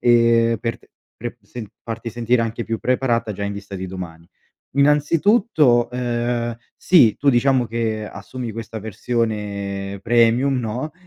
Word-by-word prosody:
E, 115 Hz, -1 st, +4 dB
per 115 Hz, -1 st, -3 dB
te -, -, -25 dB, 0.3 s
pre -, -, -6 dB
sen 120 Hz, -3 st, -8 dB, 0.2 s
farti 115 Hz, 0 st, -5 dB
sentire 120 Hz, +1 st, +1 dB
anche 115 Hz, +1 st, -3 dB
più 115 Hz, -1 st, -3 dB
preparata 120 Hz, -3 st, 0 dB
già 100 Hz, -, -6 dB
in 100 Hz, -, -2 dB
vista 100 Hz, -1 st, -8 dB
di 95 Hz, 0 st, -4 dB
domani. 85 Hz, -3 st, -8 dB, 0.5 s
Innanzitutto, 150 Hz, -, +3 dB
ehm, 120 Hz, -1 st, -1 dB, 0.2 s
sì, 135 Hz, -, +5 dB
tu, 140 Hz, -, +1 dB
diciamo 125 Hz, 0 st, +3 dB
che 110 Hz, -2 st, -2 dB
assumi 115 Hz, +4 st, -7 dB
questa 110 Hz, 0 st, -6 dB
versione 100 Hz, -3 st, -3 dB
"premium" 120 Hz, +4 st, +3 dB
no 125 Hz, +6 st, -3 dB
115 Hz, 140 wpm, -21 LUFS, 110-125 Hz, 0.5 s, sì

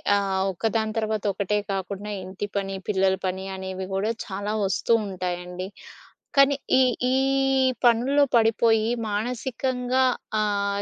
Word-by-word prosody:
ఆహ్, 195 Hz, -1 st, 0 dB
ఒకదాని 220 Hz, +3 st, -1 dB
తర్వాత 220 Hz, -1 st, -1 dB
ఒకటే 200 Hz, +1 st, 0 dB
కాకుండా 195 Hz, +2 st, -4 dB
ఇంటి 190 Hz, +2 st, -5 dB
పని, 195 Hz, -1 st, -2 dB
పిల్లల 190 Hz, -2 st, +2 dB
పని 190 Hz, +1 st, -2 dB
అనేవి 190 Hz, 0 st, -5 dB
కూడా 205 Hz, +4 st, 0 dB
చాలా 205 Hz, +1 st, -4 dB
వస్తూ 195 Hz, +4 st, +1 dB
ఉంటాయండి. 180 Hz, -1 st, -4 dB, 0.7 s
కానీ 275 Hz, 0 st, +6 dB, 0.2 s
ఈ -, -, +6 dB, 0.3 s
ఈ -, -, +3 dB, 0.7 s
పనుల్లో 250 Hz, +5 st, +4 dB
పడిపోయి. 225 Hz, -1 st, +3 dB, 0.2 s
మానసికంగా 250 Hz, +3 st, -1 dB, 0.4 s
ఆహ్, 200 Hz, -1 st, 0 dB
205 Hz, 115 wpm, -25 LUFS, 190-225 Hz, 0.7 s, కానీ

